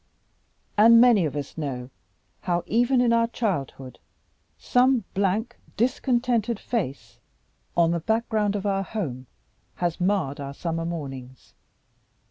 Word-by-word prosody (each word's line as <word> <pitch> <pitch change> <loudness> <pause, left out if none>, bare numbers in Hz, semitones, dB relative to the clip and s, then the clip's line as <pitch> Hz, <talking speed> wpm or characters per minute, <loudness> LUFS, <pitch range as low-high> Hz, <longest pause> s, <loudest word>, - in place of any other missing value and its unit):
And 230 +2 +8
many 230 -7 +5
of 150 - -3
us 145 +2 -5
know 130 -4 -5 0.5
how, 175 -1 -1
even 245 +3 +2
in 240 -1 +3
our 230 0 +3
childhood, 140 - -4 0.6
some 250 -1 +2
blank 200 +4 -1 0.2
discontented 240 -2 0
face 185 - -4 0.6
on 170 -1 +4
the 170 - 0
background 215 +1 0
of 205 0 -3
our 195 -1 +1
home 145 - -5 0.5
has 175 -1 -2
marred 180 -8 0
our 140 0 -6
summer 165 0 -3
mornings. 135 -6 -7
195 Hz, 120 wpm, -25 LUFS, 150-230 Hz, 0.6 s, And